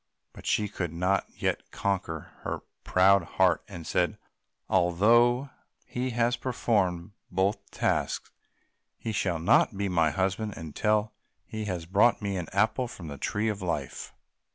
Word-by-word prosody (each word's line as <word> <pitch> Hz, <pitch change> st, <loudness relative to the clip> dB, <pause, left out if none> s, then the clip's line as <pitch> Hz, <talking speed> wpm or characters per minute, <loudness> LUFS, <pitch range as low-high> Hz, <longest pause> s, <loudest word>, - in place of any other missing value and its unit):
But -, -, -10 dB
she 105 Hz, -, +2 dB
could 90 Hz, -5 st, -4 dB
not 90 Hz, +4 st, +1 dB
yet -, -, -2 dB
conquer 95 Hz, -6 st, -2 dB
her -, -, -3 dB, 0.2 s
proud 95 Hz, +1 st, +5 dB
heart, 90 Hz, +1 st, +2 dB
and 85 Hz, -5 st, -8 dB
said, -, -, 0 dB, 0.5 s
"Although 120 Hz, +9 st, +4 dB, 0.3 s
he 125 Hz, +1 st, -3 dB
has 120 Hz, 0 st, +1 dB
performed 100 Hz, -8 st, 0 dB, 0.2 s
both 95 Hz, +3 st, 0 dB
the -, -, -15 dB
tasks, -, -, 0 dB, 0.7 s
he 115 Hz, -, -4 dB
shall 100 Hz, -4 st, 0 dB
not 85 Hz, +4 st, +3 dB
be 100 Hz, 0 st, -1 dB
my 85 Hz, -3 st, +3 dB
husband 95 Hz, +6 st, -1 dB
until 105 Hz, +7 st, 0 dB, 0.3 s
he 110 Hz, -1 st, -5 dB
has 90 Hz, -5 st, -3 dB
brought 100 Hz, +7 st, +4 dB
me 100 Hz, -2 st, -2 dB
an 90 Hz, -3 st, -3 dB
apple 110 Hz, +6 st, +2 dB
from 85 Hz, -8 st, -9 dB
the 70 Hz, -, -8 dB
Tree 105 Hz, +2 st, -1 dB
of 105 Hz, -3 st, -2 dB
Life." 75 Hz, -7 st, -3 dB
100 Hz, 150 wpm, -28 LUFS, 85-110 Hz, 0.7 s, proud